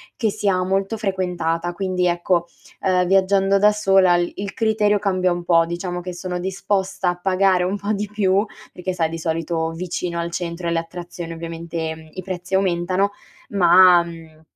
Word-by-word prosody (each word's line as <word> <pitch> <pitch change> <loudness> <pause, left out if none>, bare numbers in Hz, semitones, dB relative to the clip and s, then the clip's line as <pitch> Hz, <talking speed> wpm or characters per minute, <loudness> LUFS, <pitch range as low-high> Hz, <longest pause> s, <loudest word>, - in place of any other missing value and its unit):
che 220 -3 0
sia 195 -2 0
molto 195 +4 -1
frequentata. 175 -4 -2
Quindi, 185 -1 -1
ecco, 175 0 +1 0.4
ehm, 180 -2 +2
viaggiando 195 +1 +3
da 210 +1 +5
sola 195 -4 +4
il 175 0 -1
il 200 0 -5
criterio 210 -2 +2
cambia 185 -2 +1
un 175 0 -2
po': 165 -1 +4
diciamo 175 +1 -4
che 180 0 -6
sono 180 0 -4
disposta 190 0 -1
a 175 - -1
pagare 185 -1 +2
un 190 +3 -1
po' 205 +1 -3
di 210 +1 -2
più, 200 0 +2 0.3
perché 180 +1 -4
sai 165 -3 0
di 165 - -5
solito 165 0 -2
vicino 170 0 -4
al 170 0 -2
centro 170 0 -4
e - - +1
alle 165 0 +1
attrazioni 170 0 -7
ovviamente 165 -1 -6
i 185 - -6
prezzi 185 0 -7
aumentano, 190 +1 +1 0.4
ma, 180 -2 +6
mhmm, 165 -2 -12
180 Hz, 175 wpm, -21 LUFS, 170-195 Hz, 0.4 s, ma